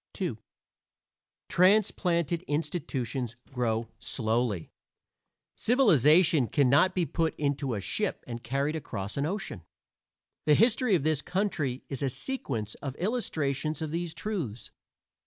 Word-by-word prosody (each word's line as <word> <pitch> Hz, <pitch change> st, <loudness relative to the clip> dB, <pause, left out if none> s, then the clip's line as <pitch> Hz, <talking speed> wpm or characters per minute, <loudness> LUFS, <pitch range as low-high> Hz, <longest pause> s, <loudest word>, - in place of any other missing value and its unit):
II -, -, -2 dB, 1.1 s
Transplanted 180 Hz, -3 st, +3 dB
institutions 135 Hz, -, -2 dB, 0.2 s
grow 115 Hz, -3 st, -1 dB
slowly; 115 Hz, -6 st, 0 dB, 0.8 s
civilization 165 Hz, -, +4 dB
can 135 Hz, -1 st, +2 dB
not 185 Hz, +7 st, +4 dB
be 180 Hz, -2 st, +2 dB
put 165 Hz, 0 st, -1 dB
into 140 Hz, -4 st, -1 dB
a -, -, -2 dB
ship 205 Hz, -, 0 dB
and 120 Hz, -1 st, -6 dB
carried 140 Hz, +5 st, -1 dB
across 105 Hz, -10 st, -5 dB
an 140 Hz, +1 st, 0 dB
ocean. 190 Hz, -, -4 dB, 0.9 s
The 150 Hz, -, +6 dB
history 230 Hz, -, +4 dB
of 160 Hz, -, 0 dB
this 155 Hz, -2 st, +1 dB
country 175 Hz, -10 st, -1 dB
is 135 Hz, -, -5 dB
a 140 Hz, -, +1 dB
sequence 120 Hz, -, -4 dB
of 135 Hz, -2 st, -4 dB
illustrations 155 Hz, -, -1 dB
of 160 Hz, -2 st, -3 dB
these 170 Hz, 0 st, -3 dB
truths. 160 Hz, -, -4 dB
150 Hz, 120 wpm, -29 LUFS, 125-180 Hz, 1.1 s, The